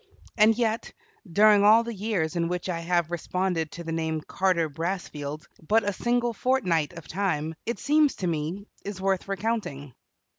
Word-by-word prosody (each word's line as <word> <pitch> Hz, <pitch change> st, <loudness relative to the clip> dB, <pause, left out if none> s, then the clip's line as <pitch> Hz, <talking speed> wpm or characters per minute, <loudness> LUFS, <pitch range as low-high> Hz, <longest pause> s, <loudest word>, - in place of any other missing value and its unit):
And 220 Hz, 0 st, +5 dB
yet, 225 Hz, -2 st, -1 dB, 0.4 s
during 205 Hz, +2 st, +6 dB
all 220 Hz, +3 st, +7 dB
the 235 Hz, 0 st, -5 dB
years 190 Hz, -6 st, -1 dB
in 170 Hz, -1 st, +1 dB
which 180 Hz, +1 st, -3 dB
I 170 Hz, -2 st, -1 dB
have 170 Hz, -1 st, 0 dB
responded 175 Hz, -1 st, -1 dB
to 170 Hz, -, -7 dB
the 165 Hz, -, -5 dB
name 160 Hz, -1 st, -1 dB
Carter 180 Hz, -1 st, +1 dB
Brassfield, 155 Hz, -2 st, -4 dB, 0.2 s
but 220 Hz, +1 st, +4 dB
a 205 Hz, -, -1 dB
single 240 Hz, +3 st, 0 dB
fortnight 185 Hz, -, +1 dB
of 170 Hz, -2 st, -10 dB
time, 160 Hz, -5 st, -1 dB
it 235 Hz, -, -1 dB
seems 300 Hz, 0 st, +3 dB
to 185 Hz, -, -4 dB
me, 170 Hz, +4 st, -2 dB, 0.2 s
is 200 Hz, -1 st, -6 dB
worth 190 Hz, 0 st, 0 dB
recounting. 195 Hz, -, -3 dB
185 Hz, 170 wpm, -26 LUFS, 165-215 Hz, 0.4 s, all